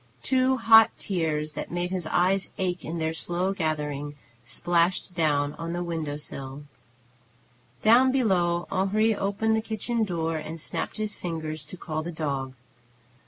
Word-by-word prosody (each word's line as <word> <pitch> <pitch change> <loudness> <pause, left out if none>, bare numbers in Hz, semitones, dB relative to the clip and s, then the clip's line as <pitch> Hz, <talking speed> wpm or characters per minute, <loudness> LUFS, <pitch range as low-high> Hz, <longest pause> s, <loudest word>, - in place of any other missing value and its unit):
Two 260 0 +3
hot 225 -2 +8
tears, 155 -5 -1
that - - -5
made 175 +1 -2
his 180 -4 -2
eyes 185 +4 +2
ache 180 -1 -1
in 165 +2 -4
their 160 0 -1
slow 175 +3 -1
gathering, 150 -4 -2 0.3
splashed 170 +9 +1
down 145 -4 +1
on 165 0 -3
the 175 0 -2
window 160 -4 -3
sill. 135 -1 -7 1.2
Down 245 +4 +6
below 180 -9 +2
Henri 210 +4 +2
opened 205 +3 0
the 220 - +1
kitchen 225 +1 -1
door 165 -5 -1
and 160 +1 -6
snapped 160 - -3
his 215 -1 -2
fingers 160 -2 -4
to 185 - -9
call 155 -2 -3
the 170 +2 -5
dog. 140 -5 -3
175 Hz, 150 wpm, -26 LUFS, 155-195 Hz, 1.2 s, hot